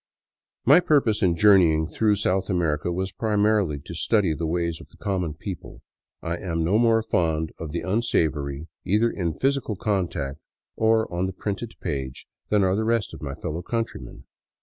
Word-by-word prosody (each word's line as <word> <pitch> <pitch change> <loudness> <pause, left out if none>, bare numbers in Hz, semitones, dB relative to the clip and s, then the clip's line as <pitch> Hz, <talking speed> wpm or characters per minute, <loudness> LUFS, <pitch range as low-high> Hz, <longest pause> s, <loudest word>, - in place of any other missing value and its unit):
My 145 +8 +8
purpose 140 -11 +2
in 90 -4 +3
journeying 85 -5 +5
through 105 +5 +1
South 95 -1 0
America 85 -3 0
was 95 +2 -2
primarily 105 -6 +1
to - - -7
study 90 +2 +2
the 80 +1 -3
ways 85 0 -1
of - - -15
the - - -20
common 90 -7 -2
people. 90 -1 -8 0.4
I 85 +1 -2
am 85 -3 -2
no 95 +7 +3
more 115 -1 +4
fond 80 -6 0
of 80 -2 -5
the 85 - -2
unsavory, 80 -8 0 0.2
either 110 +5 +2
in 85 -4 -3
physical 135 -5 0
contact 85 -9 -2 0.4
or 110 0 +3
on 90 +2 0
the 95 - -5
printed 105 +4 -4
page, 65 -2 -4 0.2
than 105 -2 +3
are 95 0 +2
the 110 - 0
rest 115 -2 0
of - - -9
my 70 -2 -5
fellow 80 +2 -4
countrymen. 115 +5 -4
95 Hz, 170 wpm, -25 LUFS, 80-110 Hz, 0.4 s, My